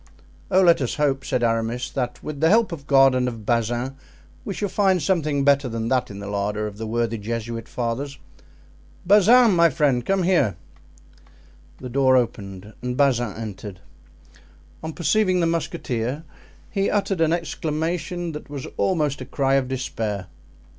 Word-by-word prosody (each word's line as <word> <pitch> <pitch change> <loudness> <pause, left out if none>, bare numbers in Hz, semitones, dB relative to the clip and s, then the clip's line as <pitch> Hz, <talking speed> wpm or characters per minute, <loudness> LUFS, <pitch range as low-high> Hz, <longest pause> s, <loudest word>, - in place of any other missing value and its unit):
"Oh, 190 0 +4
let 170 -4 +5
us 125 - -1
hope," 140 -3 0
said 125 - -1
Aramis, 115 +1 -1
"that 125 -3 -3
with 150 -2 -6
the 160 - +4
help 225 +1 +4
of 145 -4 -7
God 135 -1 +6
and 125 0 +1
of 115 -4 -6
Bazin 120 +3 0 0.5
we - - -5
shall 205 - -1
find 190 -1 +2
something 150 -4 0
better 140 -2 +3
than 115 0 -3
that 130 -1 +1
in 100 - -8
the 100 - -7
larder 105 +1 -2
of 105 0 -7
the 110 - -4
worthy 115 0 -1
Jesuit 115 +1 -4
fathers. 130 +4 -3 0.9
Bazin, 215 +5 +6
my 170 0 +5
friend, 135 -4 +1
come 195 +7 +1
here." 170 - +2 1.2
The 130 - -8
door 130 0 +4
opened 105 -4 -3
and 125 0 -3
Bazin 120 -6 +2
entered; 105 -3 -7 1.0
on 160 0 -5
perceiving 185 +4 +2
the 170 - +2
musketeer 145 -5 -2 0.5
he 195 -2 0
uttered 195 -4 0
an 160 -1 +3
exclamation 165 +1 -2
that 150 -1 -9
was 140 -2 -6
almost 150 -7 0
a - - -5
cry 135 +1 0
of 135 -2 +2
despair. 110 -6 -3
135 Hz, 160 wpm, -23 LUFS, 115-165 Hz, 1.2 s, God